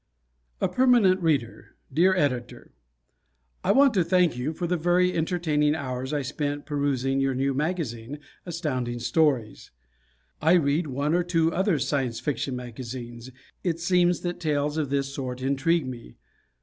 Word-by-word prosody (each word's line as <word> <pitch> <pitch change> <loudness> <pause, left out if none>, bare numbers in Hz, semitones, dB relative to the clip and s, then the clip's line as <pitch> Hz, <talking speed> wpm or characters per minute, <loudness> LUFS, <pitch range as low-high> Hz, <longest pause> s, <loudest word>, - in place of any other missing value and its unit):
A - - +2
Permanent 240 -8 +4
Reader 145 -9 -1 0.2
Dear 185 +6 +4
Editor: 125 -8 -2 0.9
I - - +3
want 275 -2 +5
to 185 -4 +3
thank 180 -4 +2
you 125 +5 -2
for 175 +2 -4
the 180 +1 0
very 175 +2 +2
entertaining 155 -3 +1
hours 130 -2 -4
I 145 -2 -1
spent 145 +1 -3
perusing 140 -2 0
your 135 -1 +1
new 135 +1 0
magazine, 145 -5 -3 0.3
Astounding 135 -9 -3
Stories. 130 -3 0 0.7
I 160 +3 +4
read 155 -1 +2
one 140 +3 -1
or 175 - +3
two 165 -2 +1
other 190 -2 +1
Science 130 -4 -1
Fiction 140 -2 -2
magazines 120 0 -7 0.3
it 165 -3 -1
seems 175 0 +2
that 175 0 -4
tales 150 -2 0
of 155 -4 -1
this 140 0 -1
sort 130 -2 -5
intrigue 140 +4 +1
me. 120 - -8
150 Hz, 150 wpm, -26 LUFS, 130-175 Hz, 0.9 s, want